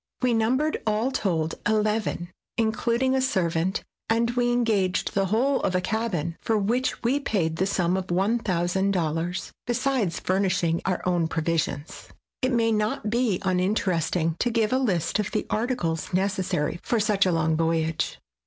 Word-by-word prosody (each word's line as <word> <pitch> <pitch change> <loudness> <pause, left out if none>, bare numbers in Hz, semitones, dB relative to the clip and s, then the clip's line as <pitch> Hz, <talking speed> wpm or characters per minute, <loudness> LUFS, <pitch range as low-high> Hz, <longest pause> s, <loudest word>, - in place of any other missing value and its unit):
We 250 -1 +3
numbered, 255 +7 +1
all 215 +5 +1
told, 165 -9 0
eleven, 210 -4 0 0.3
including 235 +3 +1
a 265 - +2
servant; 185 -8 0 0.3
and 230 +1 +2
we 245 0 +1
engaged 215 -6 +1
the 195 -1 +1
whole 255 +8 +2
of 185 - 0
a - - +3
cabin, 180 -6 -2
for 225 - +1
which 235 +7 0
we 255 +5 +2
paid 170 - -1
the 190 - +1
sum 180 -2 +1
of 190 -1 -2
$1,000, 180 -3 0 0.2
besides 245 -7 0
furnishing 180 -3 +1
our 185 -2 -1
own 175 -2 +2
provisions. 160 -2 -2 0.3
It 255 0 +1
may 230 -2 +2
not 215 0 -1
be 235 -5 +2
uninteresting 180 -3 0
to 245 - +1
give 225 -1 +1
a 260 - +3
list 195 -8 0
of 210 - -1
the 215 - -2
articles 215 -9 -1
necessary 190 -5 0
for 235 - 0
such 205 -2 +2
a - - +2
long 160 -1 +1
voyage. 165 0 0
200 Hz, 155 wpm, -25 LUFS, 175-230 Hz, 0.3 s, We